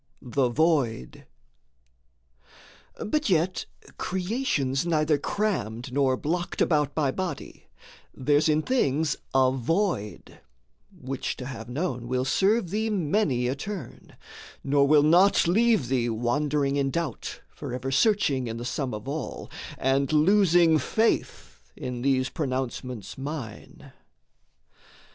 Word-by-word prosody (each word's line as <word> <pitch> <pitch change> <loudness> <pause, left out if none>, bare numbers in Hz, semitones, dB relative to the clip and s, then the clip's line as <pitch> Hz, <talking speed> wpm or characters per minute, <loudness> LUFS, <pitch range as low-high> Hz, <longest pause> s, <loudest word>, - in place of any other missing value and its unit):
THE 125 0 0
VOID 135 - 0 1.8
But 300 +3 0
yet 180 +1 +1 0.3
creation's 180 - -1
neither 155 -3 +1
crammed 125 - -2
nor 135 -2 +2
blocked 175 +5 -3
About 150 -3 +2
by 145 -4 +1
body: 185 +4 -6 0.4
there's 145 +4 +2
in 155 0 +2
things 155 - +1 0.2
a 130 -1 +5
void 135 - -2 0.5
Which 130 +1 -4
to 125 - -7
have 125 -3 -7
known 125 -3 -3
will 130 +1 -1
serve 195 - +2
thee 220 +2 0
many 160 - +1
a 125 - 0
turn, 190 +7 -8 0.5
Nor 140 0 +3
will 150 0 +5
not 175 +6 +5
leave 215 - +3
thee 120 -2 0
wandering 140 +5 0
in 140 -1 +1
doubt, 165 -4 -4
Forever 130 +2 -5
searching 140 - +2
in 115 0 -4
the 120 - -6
sum 130 -2 -2
of 105 +4 -8
all, 145 0 -5 0.3
And 135 +2 +1
losing 170 0 +4
faith 220 - -1
in 125 -1 -5
these 130 0 +2
pronouncements 130 - -4
mine. 135 -6 -7
145 Hz, 115 wpm, -26 LUFS, 130-175 Hz, 1.8 s, a